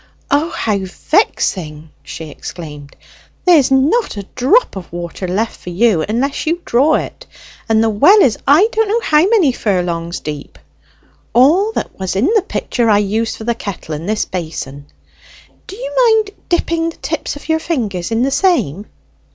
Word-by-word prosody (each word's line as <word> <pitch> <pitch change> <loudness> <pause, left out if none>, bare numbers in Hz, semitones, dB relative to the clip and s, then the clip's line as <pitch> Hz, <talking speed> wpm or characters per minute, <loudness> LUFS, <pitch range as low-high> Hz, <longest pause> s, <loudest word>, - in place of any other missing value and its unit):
"O, 295 +4 +2
how 210 - -1
vexing!" 185 - -1
she 160 -2 -8
exclaimed. 150 -3 -9 0.5
"There's 330 -7 +5
not 280 - +2
a 200 - -5
drop 300 - +2
of 185 -4 -8
water 175 +2 -5
left 210 +6 -1
for - - -8
you, 190 -1 +2
unless 270 +7 -1
you 335 +2 +1
draw 280 +6 +3
it, - - -5 0.4
and 220 0 +3
the 225 - +2
well 315 - +6
is 240 -6 +3
I 310 +10 +6
don't 445 -2 +1
know 450 +3 0
how 300 -9 +3
many 395 - +4
furlongs 175 -6 -2
deep; 150 - -7 0.8
all 325 - +4
that - - -5
was 190 -1 -3
in 250 - +2
the 435 - +4
pitcher 245 - -1
I 210 - +5
used 215 +3 -1
for - - -9
the 235 +1 0
kettle 200 -7 -7
and 160 +6 -5
this 215 0 0
basin. 150 -5 -6 0.8
Do 380 - -8
you - - -6 0.3
mind 405 - -12 0.2
dipping 335 -1 0
the 330 - -11
tips 320 -2 -4
of 290 - -11
your 320 0 +1
fingers 215 - -3
in 230 +1 0
the 270 - 0
same?" 220 - +1
230 Hz, 170 wpm, -16 LUFS, -, 0.8 s, well